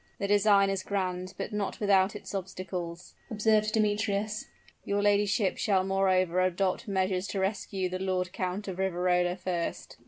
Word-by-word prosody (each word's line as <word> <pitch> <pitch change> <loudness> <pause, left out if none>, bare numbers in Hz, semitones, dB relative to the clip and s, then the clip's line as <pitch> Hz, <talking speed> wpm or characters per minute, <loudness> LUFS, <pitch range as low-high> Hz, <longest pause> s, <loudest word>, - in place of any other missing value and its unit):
"The 200 - -2
design 200 -1 +4
is 195 -1 -1
grand, 185 -2 -3
but - - -4
not 205 -2 -2
without 200 -1 +3
its 210 - -8
obstacles," 185 -2 -5 0.2
observed 215 -1 +2
Demetrius. 210 -1 0 0.4
"Your 200 0 -1
ladyship 205 -1 +2
will 190 -3 +3
moreover 185 -2 +2
adopt 185 +5 0
measures 190 -1 0
to 195 - -3
rescue 190 -1 -1
the 185 +1 -4
Lord 185 -1 -1
Count 185 +3 -3
of 190 -1 -5
Riverola 180 -1 +1
first." 175 -2 -4
190 Hz, 150 wpm, -29 LUFS, 185-205 Hz, 0.4 s, design